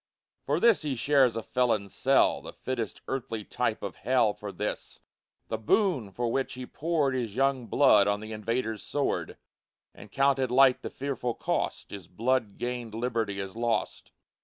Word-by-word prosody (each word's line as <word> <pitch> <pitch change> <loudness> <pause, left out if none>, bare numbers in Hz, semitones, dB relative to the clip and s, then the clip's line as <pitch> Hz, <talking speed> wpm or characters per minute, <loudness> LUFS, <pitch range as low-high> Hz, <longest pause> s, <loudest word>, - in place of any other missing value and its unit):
For 145 +3 +1
this 230 +1 +5
he 145 -4 -2
shares 130 -1 +3
a 115 - -3
felon's 110 -6 0
cell, - - +3
The - - -9
fittest 120 -5 -4
earthly 115 -5 -3
type - - -2
of - - -5
hell 125 -5 +2
For 105 -1 -7
this, 105 - -5 0.5
the 110 - -3
boon 135 - +1
for 120 +4 -2
which 135 +1 -1
he 130 0 -6
poured 155 -2 0
His 120 -5 -3
young 135 -2 +1
blood 130 -8 +5
on 100 0 +1
the 110 +1 -8
invader's 110 0 -2
sword, 145 -1 -2 0.6
And 105 - -13
counted 135 -2 +2
light 130 0 +5
the - - -5
fearful 130 -3 -3
cost; - - -2
His 100 -4 -8
blood 115 +1 -1
gained 120 -3 -4
liberty 115 -4 -2
is 95 0 -5
lost! 115 0 -2
120 Hz, 165 wpm, -28 LUFS, 110-135 Hz, 0.6 s, this